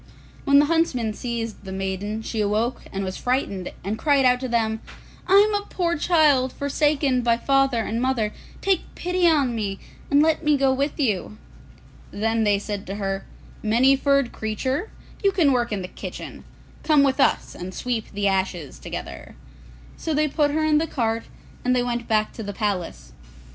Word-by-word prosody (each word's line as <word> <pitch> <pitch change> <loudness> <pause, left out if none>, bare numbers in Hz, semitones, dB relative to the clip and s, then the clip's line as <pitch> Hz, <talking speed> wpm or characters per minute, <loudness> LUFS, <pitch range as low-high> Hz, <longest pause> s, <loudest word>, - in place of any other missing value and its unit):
When 280 -1 +5
the 290 - +6
huntsmen 290 -9 +1
seized 230 -2 -5
the 190 - -7
maiden, 195 +3 -3
she 220 0 -2
awoke 215 +4 0
and 195 0 -3
was 185 0 -4
frightened, 245 -8 -1
and 210 +4 -3
cried 285 -2 +3
out 250 0 +4
to 260 - -3
them, 220 -2 0 0.5
'I 375 - +2
am 415 +1 +6
a 410 0 -1
poor 340 -2 -1
child, 295 -5 +3
forsaken 280 -2 +1
by 235 -1 +2
father 270 -2 +2
and 230 +2 -2
mother; 245 -5 0 0.3
take 385 -3 +2
pity 360 0 +1
on 285 -7 +3
me, 205 -4 -2 0.3
and 285 - +4
let 320 +1 +1
me 300 -1 +3
go 270 -1 +3
with 280 +4 -2
you.' 215 -5 -1 0.7
Then 225 +2 0
they 205 -1 +3
said 205 0 -5
to 195 - -4
her, 195 -1 -3 0.3
'Many 240 +5 +4
furred 275 -2 +2
Creature, 260 - -2 0.3
you 395 - +4
can 340 -7 +3
work 240 -2 +1
in 200 -3 -2
the - - -5
kitchen; - - -8 0.4
come 300 -3 +4
with 275 0 +1
us - - +2
and 180 +1 -7
sweep 235 +2 -3
the 200 0 0
ashes 190 -6 -2
together.' 65 0 -7 0.6
So 320 - -2
they 305 +1 +2
put 295 0 +1
her 310 +2 0
in 305 -1 +4
the 325 - -1
cart 230 -5 -1 0.4
and 250 0 +2
they 245 - +2
went 240 -1 -3
back 215 -1 +1
to - - -7
the 205 -1 -5
palace. 180 - -3
245 Hz, 185 wpm, -23 LUFS, 210-285 Hz, 0.7 s, the